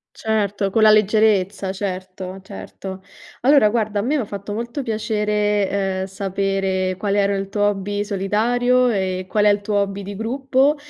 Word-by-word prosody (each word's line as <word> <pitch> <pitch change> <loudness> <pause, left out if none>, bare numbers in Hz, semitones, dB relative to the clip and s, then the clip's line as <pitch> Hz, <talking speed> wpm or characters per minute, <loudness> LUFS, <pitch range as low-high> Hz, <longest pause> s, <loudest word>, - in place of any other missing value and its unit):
Certo, 205 -2 -1
con 220 - +2
la 215 - +7
leggerezza. 210 -2 +3
Certo, 185 -1 -5
certo. 190 - -9 0.4
Allora 265 -4 +5
guarda, 215 -2 -1
a - - +1
me 285 +7 0
m'ha 245 - -1
fatto 200 0 -7
molto 235 +5 -4
piacere, 210 -3 0
ehm, 190 -1 -1
sapere 195 -1 -1
qual 200 +1 -1
era 200 0 +2
il 195 0 -3
tuo 205 0 -1
hobby 205 +1 -2
solitario 240 +6 +1
e 185 -3 -1
qual 210 -1 +2
è - - +7
il 205 0 +2
tuo 205 0 -2
hobby 200 0 -3
di 200 +1 -7
gruppo. 265 +5 +1
205 Hz, 165 wpm, -21 LUFS, 195-220 Hz, 0.4 s, la